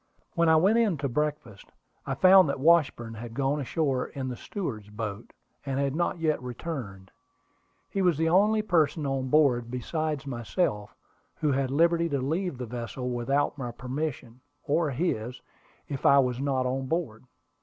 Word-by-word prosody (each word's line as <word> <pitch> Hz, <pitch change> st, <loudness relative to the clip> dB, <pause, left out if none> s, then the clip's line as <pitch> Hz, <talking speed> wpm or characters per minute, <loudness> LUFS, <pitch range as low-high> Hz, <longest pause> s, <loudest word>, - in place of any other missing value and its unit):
When 170 Hz, -1 st, +3 dB
I 160 Hz, -, +6 dB
went 195 Hz, +8 st, +4 dB
in 210 Hz, -8 st, +2 dB
to 140 Hz, 0 st, -2 dB
breakfast, 145 Hz, -6 st, -3 dB, 0.4 s
I -, -, -1 dB
found 185 Hz, -3 st, +7 dB
that 140 Hz, -, -2 dB
Washburn 140 Hz, -7 st, +3 dB
had 115 Hz, +1 st, -8 dB
gone 140 Hz, +2 st, 0 dB
ashore 135 Hz, -1 st, -1 dB
in 130 Hz, -2 st, -5 dB
the 125 Hz, -, -4 dB
steward's 115 Hz, -, -6 dB
boat, 105 Hz, 0 st, -6 dB, 0.3 s
and 135 Hz, -1 st, -2 dB
had 140 Hz, 0 st, 0 dB
not 175 Hz, +2 st, 0 dB
yet 155 Hz, -4 st, 0 dB
returned. 120 Hz, -, -6 dB, 0.8 s
He 195 Hz, -, -2 dB
was 175 Hz, -5 st, +3 dB
the 165 Hz, +1 st, +1 dB
only 210 Hz, +5 st, +3 dB
person 155 Hz, -6 st, +1 dB
on 135 Hz, -1 st, -1 dB
board, 125 Hz, -5 st, +3 dB
besides 150 Hz, +4 st, -3 dB
myself, 120 Hz, -, -2 dB, 0.4 s
who 150 Hz, -, 0 dB
had 135 Hz, -1 st, 0 dB
liberty 170 Hz, +4 st, +2 dB
to 140 Hz, -2 st, -1 dB
leave 160 Hz, +3 st, -2 dB
the 125 Hz, -, -5 dB
vessel 125 Hz, +2 st, -5 dB
without 135 Hz, +4 st, 0 dB
my 125 Hz, -2 st, -3 dB
permission, 125 Hz, 0 st, -5 dB, 0.2 s
or 155 Hz, +2 st, +1 dB
his, 125 Hz, -4 st, -2 dB, 0.5 s
if 140 Hz, -2 st, -5 dB
I 140 Hz, -, +6 dB
was 125 Hz, -2 st, +2 dB
not 135 Hz, -2 st, 0 dB
on 130 Hz, +1 st, -2 dB
board. 130 Hz, -8 st, -3 dB
140 Hz, 165 wpm, -27 LUFS, 125-160 Hz, 0.8 s, found